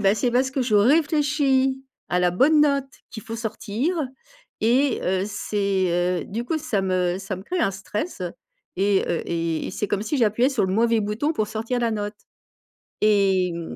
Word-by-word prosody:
«Bah 200 0 +4
c'est 240 +3 0
parce 260 +2 +1
que 265 -1 0
je 220 -4 +2
réfléchis 280 0 +2 0.2
à 180 0 +1
la 180 - +3
bonne 285 - +4
note 280 -2 +2 0.2
qu'il 220 - -9
faut 225 - -5
sortir. 230 - -2 0.6
Et 255 +4 +2
heu, 185 +1 0
c'est, 190 -4 0
heu, - - -10
du 225 +4 -4
coup, 315 +6 -1
ça 220 -11 -1
me 185 -1 0
ça 195 0 -4
me 185 - -9
crée 365 - -3
un 195 - +1
stress. 205 - -5 0.5
Et 195 0 +2
heu, 170 - -1
et 165 -1 -1
et - - -4
c'est 210 - -3
comme 205 -1 -1
si 295 +7 -2
j'appuyais 235 +4 +3
sur 255 -8 +1
le 185 - -2
mauvais 230 +1 +3
bouton 215 +10 -1
pour 215 -6 -1
sortir 225 +3 -2
la 235 -1 +1
note». 210 0 -3 0.9
Et 195 -4 +3
mmh, 170 -1 -6
215 Hz, 190 wpm, -23 LUFS, 195-265 Hz, 0.9 s, Bah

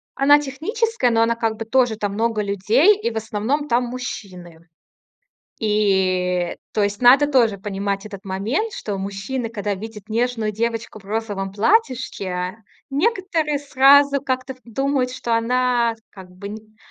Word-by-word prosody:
Она 290 +2 +5
техническая, 320 - -1
но 225 - +3
она, 230 0 +2
как 225 -1 -1
бы, 225 - -5
тоже 245 -1 +2
там 205 -2 -2
много 225 0 0
людей, 220 - +3
и 235 - -1
в 225 - -5
основном 220 +7 -2
там 245 -2 +2
мужчины. 180 -9 -8 0.9
И, 185 -4 +1 0.2
то 215 - +1
есть 205 +1 -1
надо 255 +4 +7
тоже 230 -7 +3
понимать 200 0 -3
этот 200 -2 -10
момент, 225 - -2
что 200 -2 -4
мужчины, 200 +6 -4
когда 205 -2 -3
видят 210 +1 -9
нежную 230 -1 0
девочку 230 0 -3
в 195 - -19
розовом 205 -2 -3
платьишке, 205 - 0 0.3
некоторые 325 -3 0
сразу 280 0 +5
как-то 260 0 -3
в - - -25
думают, 260 +2 -1
что 235 -2 -1
она, 240 0 +1 0.2
как 190 -2 -12
бы, 185 +2 -9
н 215 +1 -11
225 Hz, 150 wpm, -21 LUFS, 200-260 Hz, 0.9 s, надо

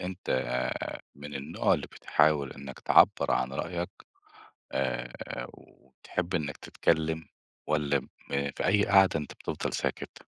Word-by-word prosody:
أنت 90 0 -5 0.8
من 75 +1 -8
النوع 70 +1 +1
اللي - - -3
بتحاول 75 -3 +2
إنك 70 -1 -9
تعبرعن 65 +1 +4
رأيك، 85 +5 -3 0.8
آآ، 65 -2 -1 0.4
وبتحب 85 +7 -6
إنك 75 -5 -1
تتكلم 80 0 0 0.4
والّا 75 -2 +2
م - - -15 0.5
في - - -1
أي 100 +2 +4
قعدة 95 -4 +6
أنت 75 - -7
بتفضل - - -3
ساكت؟ - - -3
75 Hz, 115 wpm, -29 LUFS, 70-85 Hz, 0.8 s, قعدة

